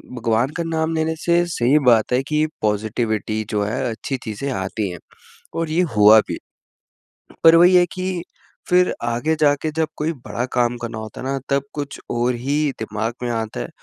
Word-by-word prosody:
भगवान 115 Hz, +1 st, +1 dB
का 170 Hz, -, -1 dB
नाम 160 Hz, 0 st, -1 dB
लेने 160 Hz, 0 st, 0 dB
से 170 Hz, +1 st, +2 dB
सही 140 Hz, -4 st, +2 dB
बात 115 Hz, -1 st, +4 dB
है 125 Hz, -, +3 dB
कि 155 Hz, 0 st, +2 dB, 0.2 s
पॉज़िटिविटी 110 Hz, 0 st, -1 dB
जो 105 Hz, -1 st, 0 dB
है 105 Hz, +2 st, -2 dB
अच्छी 130 Hz, +4 st, -4 dB
चीज़ें 110 Hz, +5 st, -4 dB
आती 100 Hz, -1 st, -2 dB
हैं। 90 Hz, -, -8 dB, 0.6 s
और 165 Hz, -1 st, -1 dB
ये 160 Hz, +3 st, +2 dB
हुआ 105 Hz, +1 st, +8 dB
भी। -, -, -3 dB, 1.1 s
पर 165 Hz, 0 st, +8 dB
वही 180 Hz, +2 st, +6 dB
है 180 Hz, 0 st, +6 dB
कि 185 Hz, -2 st, -3 dB, 0.5 s
फ़िर 180 Hz, 0 st, +4 dB
आगे 120 Hz, +7 st, 0 dB
जाके 145 Hz, +1 st, +2 dB
जब 160 Hz, +1 st, 0 dB
कोई 155 Hz, +2 st, -1 dB, 0.2 s
बड़ा 120 Hz, -, -2 dB
काम 120 Hz, -1 st, +2 dB
करना 115 Hz, -1 st, -6 dB
होता 110 Hz, -1 st, -8 dB
है -, -, -6 dB
ना 135 Hz, 0 st, -1 dB
तब 140 Hz, -1 st, +1 dB
कुछ 145 Hz, -2 st, -5 dB
और 120 Hz, +1 st, +1 dB
ही 140 Hz, +4 st, 0 dB
दिमाग 110 Hz, +1 st, -3 dB
में 120 Hz, -, -1 dB
आता 110 Hz, -, -3 dB
है। -, -, -5 dB
125 Hz, 185 wpm, -21 LUFS, 110-160 Hz, 1.1 s, हुआ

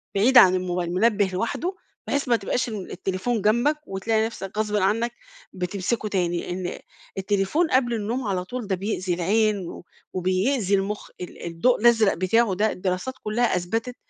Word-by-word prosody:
بعيد 245 Hz, +6 st, +5 dB
عن 185 Hz, -5 st, +8 dB
الموبايل، 180 Hz, -1 st, -2 dB
منبه 210 Hz, +1 st, +3 dB
لوحده، 285 Hz, -, -2 dB, 0.3 s
بحيث 285 Hz, -1 st, -1 dB
ما 240 Hz, -, +4 dB
تبقاش 235 Hz, +4 st, -1 dB
ال 210 Hz, -4 st, -6 dB
التليفون 195 Hz, +6 st, -2 dB
جنبَك، 240 Hz, +9 st, +2 dB
وتلاقي 220 Hz, +3 st, 0 dB
نفسك 205 Hz, -3 st, -7 dB
غصبٍ 210 Hz, -1 st, 0 dB
عنَّك 215 Hz, +4 st, +1 dB, 0.4 s
بتمسكُه 190 Hz, +5 st, -2 dB
تاني، 175 Hz, -3 st, -1 dB
إن 180 Hz, 0 st, -4 dB, 0.4 s
التليفون 200 Hz, -, +1 dB
قبل 250 Hz, -2 st, +2 dB
النوم 230 Hz, +4 st, -2 dB
على 185 Hz, -2 st, -1 dB
طول 240 Hz, +1 st, -5 dB
ده 190 Hz, -, +1 dB
بيأذي 185 Hz, -1 st, -2 dB
العين، 200 Hz, +1 st, +1 dB
و -, -, -9 dB, 0.3 s
وبيأذي 190 Hz, +4 st, +1 dB
المُخ 200 Hz, +2 st, -3 dB
ال 180 Hz, -, -8 dB
الضوء 170 Hz, +8 st, +1 dB
الأزرق 225 Hz, -4 st, +5 dB
بتاعه 190 Hz, +3 st, +2 dB
ده 215 Hz, +3 st, +1 dB
الدراسات 185 Hz, +7 st, -2 dB
كُلها 230 Hz, +3 st, +1 dB
أثبتت، 225 Hz, +8 st, -2 dB
205 Hz, 155 wpm, -24 LUFS, 185-235 Hz, 0.4 s, عن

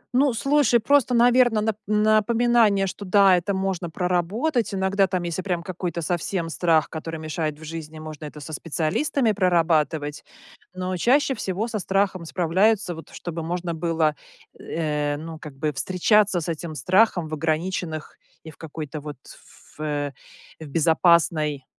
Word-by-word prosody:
Ну, 270 Hz, +1 st, +4 dB
слушай, 275 Hz, 0 st, +3 dB
просто, 255 Hz, +1 st, +3 dB
наверно, 240 Hz, -2 st, +4 dB
нап 215 Hz, -1 st, -1 dB
напоминание, 215 Hz, 0 st, +3 dB
что 200 Hz, +2 st, -6 dB
да, 195 Hz, -1 st, +5 dB
это 190 Hz, +3 st, -1 dB
можно 190 Hz, -3 st, -2 dB
проработать. 200 Hz, -, 0 dB
Иногда 195 Hz, 0 st, +1 dB
там, 185 Hz, -1 st, -2 dB
если 170 Hz, +2 st, -3 dB
прям 175 Hz, -3 st, -2 dB
какой-то 175 Hz, -2 st, -4 dB
совсем 175 Hz, 0 st, -2 dB
страх, 165 Hz, -2 st, +2 dB
который 165 Hz, 0 st, -6 dB
мешает 155 Hz, -1 st, -3 dB
в 160 Hz, -, -14 dB
жизни, 160 Hz, 0 st, -7 dB
можно 155 Hz, -1 st, -8 dB
это 150 Hz, 0 st, -9 dB
со 155 Hz, +2 st, -8 dB
специалистами 175 Hz, -, 0 dB
прорабатывать. 160 Hz, -6 st, +1 dB, 0.5 s
Но 185 Hz, 0 st, -3 dB
чаще 270 Hz, -, +3 dB
всего 210 Hz, -1 st, -3 dB
со 220 Hz, -2 st, -3 dB
страхом 190 Hz, -2 st, 0 dB
справляются 185 Hz, +4 st, +1 dB
вот, 160 Hz, 0 st, -11 dB
чтобы 170 Hz, -1 st, -6 dB
можно 170 Hz, +1 st, -3 dB
было, 160 Hz, -2 st, 0 dB, 0.4 s
э, 150 Hz, -2 st, -2 dB
ну, 160 Hz, +1 st, -8 dB
как 150 Hz, -3 st, -10 dB
бы 150 Hz, +1 st, -1 dB
встречаться 185 Hz, +2 st, +2 dB
с -, -, -6 dB
этим 165 Hz, -1 st, -4 dB
страхом 180 Hz, -, +2 dB
в 155 Hz, -, -8 dB
ограниченных 160 Hz, +1 st, -3 dB, 0.2 s
и 160 Hz, -, -9 dB
в -, -, -21 dB
какой-то 155 Hz, -1 st, -7 dB
вот 150 Hz, -2 st, -8 dB
ф -, -, -18 dB
э, 145 Hz, -2 st, -2 dB, 0.5 s
в 160 Hz, -, -8 dB
безопасной, 160 Hz, -2 st, +2 dB
175 Hz, 150 wpm, -24 LUFS, 155-205 Hz, 0.5 s, да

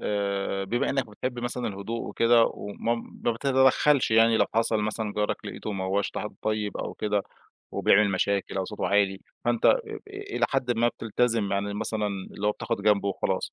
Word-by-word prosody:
آآ 100 Hz, -1 st, -1 dB
بما 120 Hz, +5 st, 0 dB
إنك 135 Hz, -3 st, 0 dB
بتحب 125 Hz, +4 st, -4 dB
مثلًا 120 Hz, 0 st, -2 dB
الهدوء 105 Hz, +3 st, -4 dB
وكده 115 Hz, 0 st, +4 dB
وما 105 Hz, +3 st, -2 dB, 0.3 s
ما 120 Hz, -, +3 dB
بتتدخلش 130 Hz, +2 st, +3 dB
يعني 115 Hz, 0 st, +5 dB
لو -, -, +3 dB
حصل 115 Hz, -1 st, +2 dB
مثلًا 105 Hz, 0 st, -2 dB
جارك 105 Hz, 0 st, 0 dB
لقيته 105 Hz, -, -5 dB
ما 95 Hz, -1 st, -3 dB
هوّاش 100 Hz, +2 st, 0 dB
ط -, -, -5 dB
حد 105 Hz, +1 st, -5 dB
طيب 105 Hz, -1 st, -1 dB
أو -, -, -4 dB
كده 105 Hz, -1 st, 0 dB, 0.5 s
وبيعمل 105 Hz, 0 st, +4 dB
مشاكل 100 Hz, +1 st, 0 dB
أو 95 Hz, -, 0 dB
صوته 105 Hz, +3 st, -3 dB
عالي، 100 Hz, -1 st, +2 dB, 0.2 s
فأنت 120 Hz, -1 st, +2 dB
إ -, -, +9 dB, 0.4 s
إ 405 Hz, 0 st, -7 dB
إلى -, -, +3 dB
حدٍ 135 Hz, -3 st, 0 dB
ما 120 Hz, +1 st, +4 dB
بتلتزِم، 115 Hz, -2 st, 0 dB
يعني 100 Hz, +1 st, -1 dB
مثلًا 105 Hz, 0 st, -1 dB
اللي 100 Hz, 0 st, -4 dB
هو 105 Hz, -, +3 dB
بتاخد 115 Hz, -1 st, -3 dB
جنب 105 Hz, -1 st, +3 dB
وخلاص. 100 Hz, -1 st, -1 dB
105 Hz, 185 wpm, -27 LUFS, 100-120 Hz, 0.5 s, إ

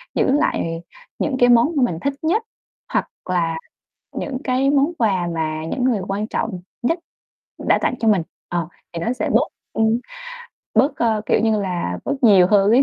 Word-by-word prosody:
giữ -, -, +2 dB
lại 165 Hz, -, 0 dB, 0.4 s
những 275 Hz, -, 0 dB
cái 245 Hz, 0 st, +5 dB
món 240 Hz, +6 st, +5 dB
mà 275 Hz, -, +3 dB
mình 170 Hz, -9 st, 0 dB
thích 280 Hz, 0 st, 0 dB
nhất, 385 Hz, +8 st, +1 dB, 0.5 s
hoặc -, -, +1 dB, 0.2 s
là 165 Hz, -3 st, +1 dB, 0.6 s
những 265 Hz, -3 st, -3 dB
cái 260 Hz, +1 st, +2 dB
món 285 Hz, +4 st, +3 dB
quà 190 Hz, -, +1 dB
mà 155 Hz, 0 st, -2 dB
những 245 Hz, +9 st, -2 dB
người 235 Hz, -6 st, +2 dB
quan 205 Hz, +2 st, -2 dB
trọng 185 Hz, -, -2 dB, 0.2 s
nhất 330 Hz, +8 st, +1 dB, 0.7 s
đã -, -, +5 dB
tặng -, -, +1 dB
cho 225 Hz, -, 0 dB
mình. 195 Hz, -6 st, +4 dB, 0.3 s
Ờ, 170 Hz, -2 st, -1 dB, 0.3 s
thì 165 Hz, -, -3 dB
nó 235 Hz, +8 st, -1 dB
sẽ -, -, -2 dB
bớt, -, -, +3 dB, 0.3 s
ừm, 220 Hz, +1 st, +2 dB, 0.8 s
bớt, 265 Hz, +7 st, +3 dB
ơ, 220 Hz, -2 st, +1 dB
kiểu -, -, +3 dB
như 220 Hz, -2 st, +2 dB
là, 175 Hz, -, -2 dB
bớt -, -, 0 dB
nhiều 195 Hz, -6 st, +7 dB
hơn 200 Hz, 0 st, +4 dB
ấy. 255 Hz, +4 st, +6 dB
220 Hz, 185 wpm, -21 LUFS, 180-255 Hz, 0.8 s, nhiều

